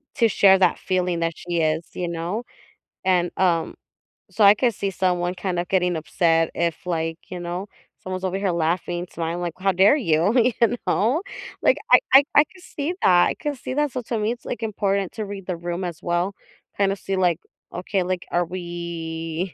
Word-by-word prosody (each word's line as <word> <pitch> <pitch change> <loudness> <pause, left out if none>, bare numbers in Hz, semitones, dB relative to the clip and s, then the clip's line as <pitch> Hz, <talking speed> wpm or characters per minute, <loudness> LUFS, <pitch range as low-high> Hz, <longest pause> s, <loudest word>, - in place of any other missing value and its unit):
to 230 -4 +4
share 195 -2 +6
that 180 -2 +3
feeling 180 -2 -1
that 165 0 -1
she 175 -1 -3
is, 160 +1 0
you 175 - -3
know? 170 +7 -3 0.6
And, 180 -2 +2
um 175 -3 +1 0.6
so, 220 - +1
I 200 - +8
could 240 +1 +1
see 200 0 -2
someone 180 -1 0
kinda 180 -2 -2
getting 180 -1 +1
upset 165 0 +1
if, 170 0 -2
like, 165 -1 -1
you 180 - -6
know, 175 +3 -4 0.3
someone's 185 0 -5
over 185 +1 -1
here 195 -1 0
laughing, 175 +1 -1
smiling 170 +1 -3
li 175 - -2
how 195 - +4
dare 195 +9 +5
you? 170 - +2 0.3
You 235 +1 +3
know? 250 - +2 0.4
Like, - - +4
I - - +9
I 270 - +9
I 295 - +8
can 375 - -19
see 305 0 -4
that, 175 -1 +6
I - - -3
can 295 - -3
see 255 - -6
that, 295 -2 +1
so, 255 - -3
to 230 0 -3
me, 215 +2 0
it's, 240 - -15
like, 235 - -5
important 200 -3 -1
to 215 - -4
read 200 -2 -7
the 180 -2 -2
room 175 +2 -4
as 170 -3 -5
well. 175 +3 0 0.4
Kind 195 -1 +2
of 195 - -9
see, 195 - -3
like, 175 -3 +2 0.4
okay, 185 +2 -1
like, 180 0 -3
are 175 0 +1
we, 170 -1 -5
180 Hz, 200 wpm, -23 LUFS, 170-200 Hz, 0.6 s, I